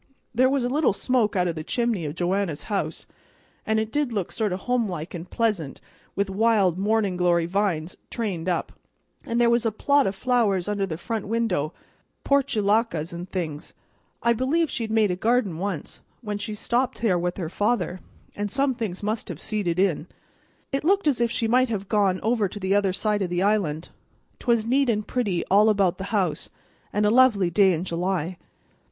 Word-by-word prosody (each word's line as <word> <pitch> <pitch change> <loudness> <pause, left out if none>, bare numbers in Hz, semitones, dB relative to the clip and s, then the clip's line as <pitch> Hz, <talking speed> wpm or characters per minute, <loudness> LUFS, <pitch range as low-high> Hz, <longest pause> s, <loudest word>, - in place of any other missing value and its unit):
There 255 +2 +4
was 270 -2 +1
a - - +1
little 280 -2 +2
smoke 235 -1 +1
out 180 -1 +2
o' - - +1
the 155 -1 -6
chimney 230 -5 -1
o' - - -3
Joanna's 175 -2 -1
house, 200 +3 -3 0.6
and 220 0 +2
it 220 0 -2
did 290 -2 0
look 200 -6 -2
sort 215 -3 -1
of 185 +1 -3
homelike 200 -10 -2
and 175 0 -7
pleasant 205 -12 -1 0.4
with 200 0 0
wild 195 -3 +2
mornin' 205 -2 +1
glory 175 -1 +2
vines 180 -3 -1
trained 185 -7 -3
up; 175 - -1 0.6
an' 230 - -1
there 240 0 +4
was 235 0 +3
a 225 - +1
plot 280 +5 +2
o' - - +1
flowers 205 -3 +1
under 205 -1 -1
the 160 -3 -4
front 215 +4 -4
window, 205 -9 0 0.5
portulacas 220 - +1
and 175 +2 -7
things. 160 -5 -5 0.5
I 235 - +4
believe 275 +6 +1
she'd 225 -3 -3
made 220 -3 +3
a - - 0
garden 215 -4 +1
once, 190 -5 -4 0.2
when 210 -3 -4
she 215 +1 -4
was 210 - -8
stopping 245 0 -1
there 185 -6 +3
with 175 +1 -2
her 175 -4 -3
father, 205 0 -1 0.4
and 205 0 -2
some 270 +4 +1
things 215 -6 -5
must 215 +2 -2
have - - -6
seeded 200 -6 -2
in. 180 -4 +1 0.6
It 275 +1 -1
looked 390 +1 +2
as 265 -5 +2
if 235 - +3
she 230 0 -1
might 250 +2 +3
have 200 -3 -3
gone 200 -3 +2
over 225 -2 +2
to 205 - -8
the 190 0 0
other 200 -2 +3
side 205 +2 0
of 185 - -1
the 175 +1 0
island. 185 -7 0 0.5
'Twas 235 -3 +1
neat 265 +2 +2
and 210 -2 0
pretty 205 -9 -1
all 210 +3 +6
about 200 -4 +2
the 190 - -4
house, 190 -7 -1 0.4
and 210 +1 +1
a 210 - +4
lovely 225 -8 +4
day 195 -1 +5
in 170 -1 -1
July. 180 -1 -2
205 Hz, 195 wpm, -25 LUFS, 180-230 Hz, 0.6 s, all